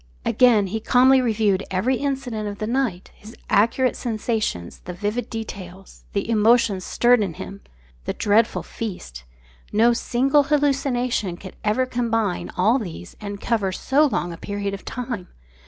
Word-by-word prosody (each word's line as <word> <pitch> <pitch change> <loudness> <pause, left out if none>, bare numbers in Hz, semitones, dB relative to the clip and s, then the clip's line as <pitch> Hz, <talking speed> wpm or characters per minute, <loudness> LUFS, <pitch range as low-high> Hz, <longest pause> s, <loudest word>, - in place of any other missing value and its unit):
Again 235 -5 +4
he 210 +4 -3
calmly 260 +4 +5
reviewed 215 -5 +1
every 225 +8 +1
incident 260 -6 -3
of 205 - -7
the 215 - -3
night; 230 -6 -1
his 215 +3 -14 0.2
accurate 230 +5 +3
sensations; 215 - -2
the 180 - -5
vivid 210 +6 -3
details; 195 -4 -8
the 200 0 -1
emotions 220 -3 +3
stirred 245 +3 +3
in 185 -6 -2
him; 200 0 -8 0.4
the - - -2
dreadful 220 +1 +2
feast 65 - -7 0.5
no 230 +3 +4
single 265 +4 +2
hallucination 270 - 0
could 190 0 -10
ever 215 +5 +2
combine 225 -6 -1
all 220 +8 +3
these 165 - -8
and 200 -1 -6
cover 215 -5 0
so 280 +10 +2
long 175 -10 -2
a - - -9
period 200 +2 -4
of 195 - -7
time. 235 -7 -5
220 Hz, 150 wpm, -23 LUFS, 200-245 Hz, 0.5 s, calmly